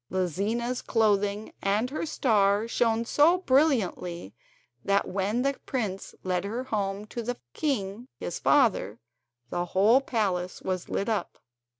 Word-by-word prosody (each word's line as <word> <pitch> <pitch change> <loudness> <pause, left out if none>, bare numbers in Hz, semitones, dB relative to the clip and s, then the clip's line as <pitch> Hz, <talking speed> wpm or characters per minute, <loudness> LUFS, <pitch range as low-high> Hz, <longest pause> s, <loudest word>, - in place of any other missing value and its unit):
Lizina's 205 +7 -1
clothing 210 -2 +1
and 210 +6 +1
her 310 +2 -3
star 210 -6 +2
shone 230 -1 +1
so 305 +8 +4
brilliantly 245 - +1 0.5
that 200 0 +2
when 200 +6 -1
the 275 0 +2
prince 210 -7 -3
led 180 -1 0
her 225 +5 -3
home 205 -4 -2
to 235 +2 -5
the 245 +1 -3 0.2
king, 235 -5 -2
his - - -4
father, 190 - +3 0.5
the 175 - 0
whole 225 +7 +6
palace 190 -8 -1
was 185 -2 -3
lit 200 - -1
up. 220 -3 -2
215 Hz, 130 wpm, -27 LUFS, 195-245 Hz, 0.5 s, whole